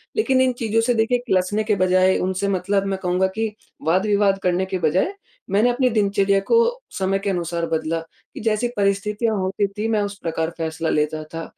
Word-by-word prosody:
लेकिन 265 -12 +2
इन 255 -1 +3
चीज़ों 225 0 +1
से 245 +2 +2
देखिए 230 +2 +2
किलसने 190 +2 +1
के 215 -1 +1
बजाए 185 0 +3
उनसे 190 +2 -1
मतलब, 195 +1 0
मैं 195 -1 -1
कहूँगा 180 +1 +2
कि 220 -1 -2 0.3
वाद-विवाद 195 +2 +2
करने 180 +1 +1
के 190 -1 -3
बजाए 180 - +1 0.4
मैंने 215 +5 +4
अपनी 250 +1 +2
दिनचर्या 200 -2 +2
को 465 - +4 0.4
समय 195 0 0
के 200 - -2
अनुसार 170 -2 -2
बदला 160 +1 -1 0.3
कि - - -8
जैसी 220 +2 +1
परिस्थितियाँ 210 +3 0
होती 195 +1 0
थी 215 +2 -1
मैं 215 -2 +2
उस 200 0 -4
प्रकार 165 -1 -1
फैसला 160 0 -2
लेता 155 +1 0
था 165 - -4
195 Hz, 185 wpm, -22 LUFS, 180-215 Hz, 0.4 s, मैंने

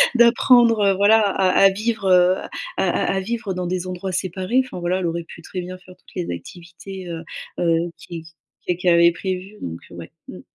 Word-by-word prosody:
d'apprendre, 235 -1 +5
heu, 195 - +4
voilà, 210 +3 +5
à 195 -2 +1
à 195 +1 +6
vivre, 220 +2 -2
heu, 180 0 +5
à - - -8 0.3
à - - +1 0.3
à - - +1
vivre 225 -1 -3
dans 180 -1 -3
des 185 0 -3
endroits 185 +1 -4
séparés. 185 +7 0
Enfin 215 -8 -8
voilà, 180 +2 0
elle 180 - -2
aurait 170 0 -3
pu 165 - -13
très 180 +2 -6
bien 185 +1 -7
faire 185 0 -16
toutes - - -23
les 175 - -3
activités, 180 - -10
heu, 165 0 -6 0.4
heu, 170 0 +1
qui 165 -2 -9 0.4
qu 180 - +1
qu'elle 180 -1 +3
avait 170 0 +6
prévues, 190 +3 -5
donc, 85 0 -6
heu, - - -11
ouais. - - -10 0.2
Mmh. - - -9
185 Hz, 210 wpm, -21 LUFS, 175-200 Hz, 0.4 s, à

